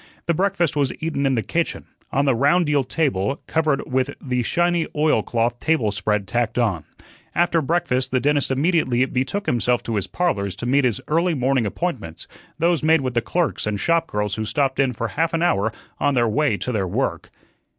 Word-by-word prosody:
The 170 Hz, -, +2 dB
breakfast 185 Hz, -1 st, 0 dB
was 140 Hz, -3 st, +1 dB
eaten 155 Hz, -4 st, -1 dB
in 135 Hz, -, +2 dB
the 115 Hz, -, 0 dB
kitchen, 170 Hz, 0 st, -2 dB, 0.3 s
on 140 Hz, +1 st, +1 dB
the 135 Hz, -, +3 dB
round 145 Hz, +9 st, +3 dB
deal 145 Hz, -2 st, +2 dB
table 135 Hz, -, -1 dB
covered 155 Hz, -3 st, 0 dB
with 130 Hz, +1 st, 0 dB
the 125 Hz, -2 st, -1 dB
shiny 175 Hz, +6 st, +1 dB
oilcloth 120 Hz, -5 st, +1 dB
table 155 Hz, -10 st, +1 dB
spread 100 Hz, +1 st, -1 dB
tacked 120 Hz, +4 st, -1 dB
on. 105 Hz, -10 st, 0 dB, 0.5 s
After 170 Hz, -1 st, +2 dB
breakfast 135 Hz, -4 st, 0 dB
the 130 Hz, -, +1 dB
dentist 145 Hz, +1 st, +1 dB
immediately 135 Hz, -3 st, +2 dB
betook 135 Hz, +11 st, -2 dB
himself 120 Hz, 0 st, +1 dB
to 115 Hz, -2 st, -2 dB
his 100 Hz, -, -2 dB
"Parlors" 100 Hz, -, -1 dB
to 115 Hz, -, -6 dB
meet 135 Hz, +2 st, +3 dB
his 120 Hz, -5 st, 0 dB
early 165 Hz, +2 st, +1 dB
morning 130 Hz, -3 st, +1 dB
appointments 105 Hz, -, -4 dB, 0.3 s
those 170 Hz, 0 st, +2 dB
made 160 Hz, 0 st, +4 dB
with 130 Hz, -2 st, -2 dB
the 120 Hz, -, +1 dB
clerks 170 Hz, -4 st, -1 dB
and 105 Hz, -1 st, -1 dB
shop 165 Hz, +4 st, +1 dB
girls 105 Hz, -1 st, -2 dB
who 110 Hz, +2 st, -2 dB
stopped 130 Hz, +5 st, 0 dB
in 135 Hz, -2 st, +3 dB
for 115 Hz, -1 st, -3 dB
half 165 Hz, +1 st, 0 dB
an 165 Hz, -, 0 dB
hour 110 Hz, -, +2 dB, 0.3 s
on 145 Hz, -1 st, +1 dB
their 120 Hz, -1 st, +3 dB
way 135 Hz, -1 st, +1 dB
to 125 Hz, -, -3 dB
their 100 Hz, -5 st, -1 dB
work. -, -, -2 dB
135 Hz, 195 wpm, -22 LUFS, 115-160 Hz, 0.5 s, made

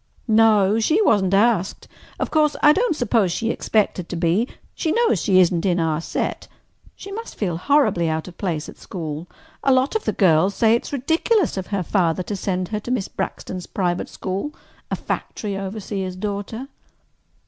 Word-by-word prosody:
"No. 215 Hz, -2 st, +4 dB
She 310 Hz, -, +2 dB
wasn't 195 Hz, -, +3 dB
asked. 205 Hz, -3 st, +1 dB, 0.3 s
Of -, -, -2 dB
course, 305 Hz, -1 st, +3 dB
I 295 Hz, -, +8 dB
don't 440 Hz, -1 st, +1 dB
suppose 230 Hz, -, +1 dB
she 225 Hz, +6 st, -1 dB
expected 200 Hz, -5 st, 0 dB
to -, -, -4 dB
be. 175 Hz, +7 st, +1 dB, 0.3 s
She 320 Hz, -, -1 dB
knows 470 Hz, +3 st, +2 dB
she 190 Hz, -3 st, +4 dB
isn't 175 Hz, -2 st, +3 dB
in 180 Hz, -2 st, +1 dB
our 160 Hz, -1 st, 0 dB
set. -, -, -3 dB, 0.5 s
She 395 Hz, -, -10 dB
must 455 Hz, +3 st, -7 dB
feel 180 Hz, -6 st, -2 dB
horribly 185 Hz, -, +2 dB
out 160 Hz, +2 st, -2 dB
of 180 Hz, -, -10 dB
place 165 Hz, -5 st, -2 dB
at -, -, -12 dB
school. 160 Hz, -2 st, -6 dB, 0.4 s
A 275 Hz, -, +4 dB
lot 260 Hz, +7 st, +2 dB
of 440 Hz, -, -1 dB
the -, -, +2 dB
girls 185 Hz, 0 st, +3 dB
say 225 Hz, -1 st, +4 dB
it 235 Hz, -, 0 dB
is -, -, -9 dB
ridiculous 325 Hz, -, +1 dB
of 190 Hz, -2 st, -4 dB
her 200 Hz, -3 st, -1 dB
father 175 Hz, -1 st, +1 dB
to 205 Hz, -, -4 dB
send 185 Hz, -2 st, -2 dB
her 210 Hz, -, -2 dB
to 215 Hz, -, -9 dB
Miss 245 Hz, -6 st, 0 dB
Braxton's 180 Hz, -1 st, -5 dB
private 175 Hz, -2 st, -1 dB
school—a 195 Hz, -, -6 dB
factory 205 Hz, -2 st, -4 dB
overseer's 195 Hz, -1 st, -4 dB
daughter." 205 Hz, +6 st, -4 dB
200 Hz, 180 wpm, -22 LUFS, 180-245 Hz, 0.5 s, I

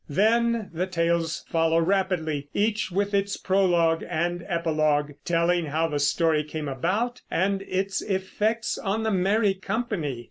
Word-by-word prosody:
Then 225 Hz, +5 st, +2 dB
the 180 Hz, +3 st, -1 dB
tales 170 Hz, -2 st, 0 dB
follow 165 Hz, 0 st, +2 dB
rapidly, 165 Hz, -5 st, 0 dB
each 210 Hz, 0 st, +1 dB
with 200 Hz, +3 st, -1 dB
its 200 Hz, 0 st, 0 dB
prologue 175 Hz, -4 st, +2 dB
and 175 Hz, +2 st, -1 dB
epilogue, 155 Hz, -3 st, +1 dB
telling 170 Hz, 0 st, +1 dB
how 160 Hz, +3 st, 0 dB
the 145 Hz, -1 st, -1 dB
story 155 Hz, +2 st, +2 dB
came 150 Hz, 0 st, -5 dB
about, 200 Hz, -, -1 dB
and 195 Hz, +2 st, 0 dB
its 195 Hz, +1 st, -1 dB
effects 210 Hz, +4 st, -1 dB
on 215 Hz, +2 st, -1 dB
the 220 Hz, -, 0 dB
merry 200 Hz, +2 st, +2 dB
company. 195 Hz, -, -3 dB
180 Hz, 140 wpm, -25 LUFS, 165-200 Hz, -, Then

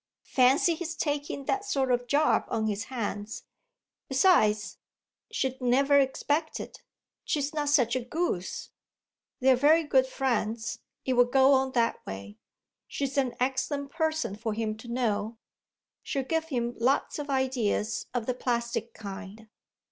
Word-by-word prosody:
Fancy 265 Hz, +6 st, +4 dB
his 330 Hz, 0 st, -5 dB
taking 290 Hz, -2 st, -2 dB
that 405 Hz, +6 st, 0 dB
sort 270 Hz, -10 st, 0 dB
of 245 Hz, 0 st, 0 dB
job 295 Hz, +4 st, +3 dB
on 220 Hz, -, -1 dB
his 210 Hz, 0 st, -2 dB
hands! 215 Hz, -3 st, -4 dB, 0.7 s
Besides, 215 Hz, -, +3 dB, 0.5 s
she'd 265 Hz, -, -2 dB
never 275 Hz, +3 st, +4 dB
expect 290 Hz, +3 st, 0 dB
it; -, -, -9 dB, 0.4 s
she's 290 Hz, 0 st, -1 dB
not 295 Hz, -2 st, -1 dB
such 255 Hz, -5 st, +3 dB
a -, -, +1 dB
goose. 245 Hz, -, -3 dB, 0.7 s
They're 260 Hz, 0 st, +6 dB
very 305 Hz, +6 st, +5 dB
good 265 Hz, -3 st, +3 dB
friends 230 Hz, -4 st, -1 dB, 0.3 s
it 260 Hz, -, +1 dB
will 245 Hz, 0 st, +5 dB
go 265 Hz, +2 st, +5 dB
on 265 Hz, -1 st, +2 dB
that 230 Hz, -2 st, +1 dB
way. 100 Hz, +2 st, -8 dB, 0.5 s
She's 275 Hz, 0 st, -3 dB
an 260 Hz, -4 st, +1 dB
excellent 270 Hz, +2 st, -1 dB
person 315 Hz, -, -1 dB
for 220 Hz, 0 st, -3 dB
him 220 Hz, -1 st, -2 dB
to 225 Hz, -, -12 dB
know; 225 Hz, -2 st, -1 dB, 0.6 s
she'll 275 Hz, -, -2 dB
give 320 Hz, +4 st, -1 dB
him 240 Hz, -6 st, -2 dB
lots 265 Hz, +5 st, +1 dB
of 295 Hz, 0 st, -5 dB
ideas 255 Hz, -5 st, 0 dB
of 240 Hz, -2 st, -2 dB
the 255 Hz, -, 0 dB
plastic 235 Hz, -1 st, -2 dB
kind. 205 Hz, +1 st, -9 dB
255 Hz, 145 wpm, -28 LUFS, 225-285 Hz, 0.7 s, They're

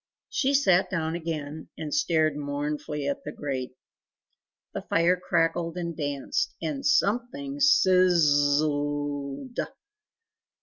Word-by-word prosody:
She 280 Hz, 0 st, +1 dB
sat 190 Hz, -10 st, +3 dB
down 160 Hz, -4 st, -2 dB
again, 160 Hz, -2 st, -5 dB
and 150 Hz, -2 st, -5 dB
stared 155 Hz, 0 st, +2 dB
mournfully 145 Hz, 0 st, -3 dB
at 140 Hz, -, -2 dB
the 150 Hz, -, -5 dB
grate. 130 Hz, -4 st, -4 dB, 1.0 s
The -, -, -3 dB
fire 170 Hz, +2 st, +2 dB
crackled 170 Hz, -1 st, 0 dB
and 170 Hz, -2 st, -3 dB
danced, 145 Hz, -3 st, -2 dB
and 275 Hz, -3 st, -3 dB
something 275 Hz, +3 st, 0 dB
sizz 185 Hz, -11 st, +5 dB, 0.4 s
z 150 Hz, -, +2 dB
zled! 145 Hz, -, -3 dB
160 Hz, 115 wpm, -27 LUFS, 145-190 Hz, 1.0 s, sizz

